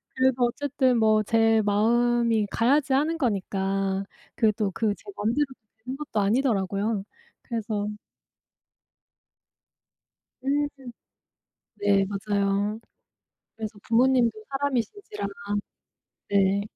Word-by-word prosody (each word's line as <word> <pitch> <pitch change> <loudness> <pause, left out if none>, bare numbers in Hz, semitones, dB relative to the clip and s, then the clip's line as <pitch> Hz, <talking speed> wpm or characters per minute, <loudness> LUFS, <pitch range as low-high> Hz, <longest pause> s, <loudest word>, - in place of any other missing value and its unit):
그래도 260 -1 +3
어쨌든 260 0 +1
뭐 215 -1 +4
제 225 +1 +3
마음이 230 +1 +2
가야지 270 +6 +2
하는 310 +5 +2
거니까 195 - -1 0.3
그게 220 -2 +3
또 205 -3 -1
그 210 +2 0
제 - - -22
맘대로 235 +8 +1 0.4
되는 260 +2 -4
것도 295 -7 -3
아니더라고요. 205 -2 +1 0.4
그래서 215 -3 -3 2.6
음 290 +1 +2 1.1
네. 200 -1 +3
맞아요. 200 +1 -1 0.8
그래서 215 -1 -6
부모님도 245 0 +4 0.2
사람이신지라. 285 - -2 1.0
네. 200 0 +3
225 Hz, 210 characters per minute, -26 LUFS, 205-260 Hz, 2.6 s, 뭐